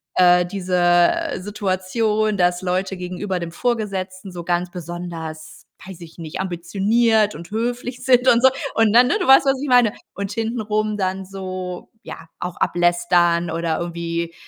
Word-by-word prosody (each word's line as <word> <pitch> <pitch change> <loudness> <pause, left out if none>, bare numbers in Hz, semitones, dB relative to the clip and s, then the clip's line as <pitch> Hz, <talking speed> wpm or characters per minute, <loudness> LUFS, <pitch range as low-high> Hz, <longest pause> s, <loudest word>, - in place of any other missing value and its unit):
äh, 180 -1 +5
diese, 185 0 -3
äh, 175 - +2
Situation, 210 +2 -1
dass 180 0 +1
Leute 185 +1 -2
gegenüber 180 +1 -4
dem 170 -1 -5
Vorgesetzten 195 -4 -3
so 175 -1 -6
ganz 175 +1 -1
besonders, 165 -2 -7 0.2
weiß 190 -3 -10
ich 165 0 -12
nicht, 160 -2 -7
ambitioniert 205 +5 +1
und 170 +2 -10
höflich 245 +2 -3
sind 250 -1 +3
und 235 -1 +5
so. 265 - +8 0.2
Und 225 -1 +3
dann, 245 +1 +7
ne, 350 - +1
du - - -1
weißt, 270 +1 +7
was 270 0 +1
ich 290 - -3
meine. 245 -4 +4 0.2
Und 200 0 -4
hintenrum 215 -1 -2
dann 190 0 -2
so, 185 -1 -7
ja, 165 - -10
auch 180 0 -5
ablästern 175 -1 +2
oder 165 0 -1
irgendwie 170 -1 -4
185 Hz, 155 wpm, -21 LUFS, 175-215 Hz, 0.2 s, so